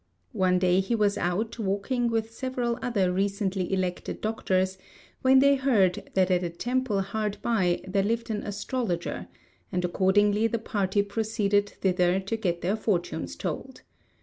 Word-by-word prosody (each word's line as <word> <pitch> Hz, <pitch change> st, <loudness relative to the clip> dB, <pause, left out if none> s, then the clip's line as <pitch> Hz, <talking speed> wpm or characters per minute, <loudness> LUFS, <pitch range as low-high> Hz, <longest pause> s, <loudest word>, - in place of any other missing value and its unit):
One 185 Hz, -1 st, +2 dB
day 180 Hz, 0 st, +3 dB
he 195 Hz, +5 st, 0 dB
was 210 Hz, -2 st, +2 dB
out 215 Hz, +7 st, -2 dB
walking 220 Hz, +5 st, 0 dB
with 225 Hz, -1 st, -1 dB
several 245 Hz, -2 st, -2 dB
other 200 Hz, -7 st, +1 dB
recently 195 Hz, -1 st, -1 dB
elected 185 Hz, -2 st, -2 dB
doctors, 190 Hz, -3 st, 0 dB, 0.4 s
when 260 Hz, +1 st, +5 dB
they 280 Hz, +1 st, +6 dB
heard 235 Hz, -10 st, +2 dB
that 190 Hz, -1 st, +3 dB
at 180 Hz, -1 st, +3 dB
a 175 Hz, -, -1 dB
temple 240 Hz, +3 st, -1 dB
hard 210 Hz, +1 st, -2 dB
by 190 Hz, -7 st, +1 dB
there 195 Hz, +1 st, +1 dB
lived 230 Hz, +3 st, -1 dB
an 210 Hz, -1 st, -2 dB
astrologer, 200 Hz, -, -3 dB, 0.4 s
and 180 Hz, 0 st, 0 dB
accordingly 205 Hz, +4 st, +3 dB
the 230 Hz, -, -1 dB
party 205 Hz, -3 st, 0 dB
proceeded 205 Hz, -1 st, 0 dB
thither 180 Hz, -1 st, +2 dB
to 195 Hz, +4 st, -3 dB
get 175 Hz, -6 st, -1 dB
their 190 Hz, +4 st, +1 dB
fortunes 175 Hz, -, -2 dB
told. -, -, -5 dB
200 Hz, 150 wpm, -27 LUFS, 185-225 Hz, 0.4 s, they